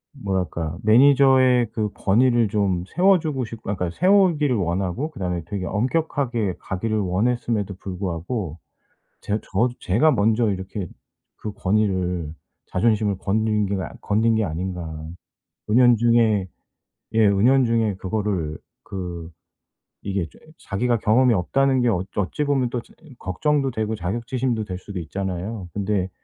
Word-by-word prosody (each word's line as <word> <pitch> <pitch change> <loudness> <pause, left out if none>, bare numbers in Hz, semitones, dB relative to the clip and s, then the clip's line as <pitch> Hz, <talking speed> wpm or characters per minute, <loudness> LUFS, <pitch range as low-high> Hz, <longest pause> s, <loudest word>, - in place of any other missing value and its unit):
뭐랄까? 90 - -3
매니저의 130 +1 +5
그 110 -2 -1
권위를 120 +3 +3
좀 100 -4 0
세워 190 - +4
주고 145 -6 -2
싶고 110 -2 -6
아 - - -1
그러니까 90 -2 -4
세우기를 175 -8 +4
원하고 95 - -1
그 155 - -17
다음에 90 -2 -2
되게 95 +1 -4
엄격하게 120 - -1
가기를 110 +4 -2
원했음에도 105 +1 0
불구하고 90 - -4 0.6
제 100 - -2
저도 110 +7 0
제가 115 +12 +3
먼저 110 -2 +2
이렇게 95 -1 -4 0.5
그 105 - -6
권위를 95 -6 0 0.3
자존심을 105 0 +1
건드린 105 +1 0
게 100 - -2
아 - - -5
건드린 110 +2 +2
게 110 -1 +1
아닌가 90 +1 -4
하는 80 +1 -8 0.5
은연중에 115 -3 +4 0.7
예 110 -1 +4
은연중에 115 0 +3
그거를 95 -5 -2 0.3
그 85 -3 -6 0.7
이게 100 -4 -2
조금 - - -21
자기가 120 +5 -1
경험이 120 +4 +3
없다는 135 +7 +2
게 120 - +3
엊 95 -3 -1
어찌 105 +9 -1
보면 135 -4 +1
또 120 - -2
조 - - -22
어 - - -28 0.2
걱정도 135 - 0
되고 110 -3 -2
자격지심도 115 +5 -2
될 90 -3 -5
수도 100 +1 -8
있잖아요. 95 +3 -4
근데 100 -2 -1
105 Hz, 315 characters per minute, -23 LUFS, 95-120 Hz, 0.7 s, 매니저의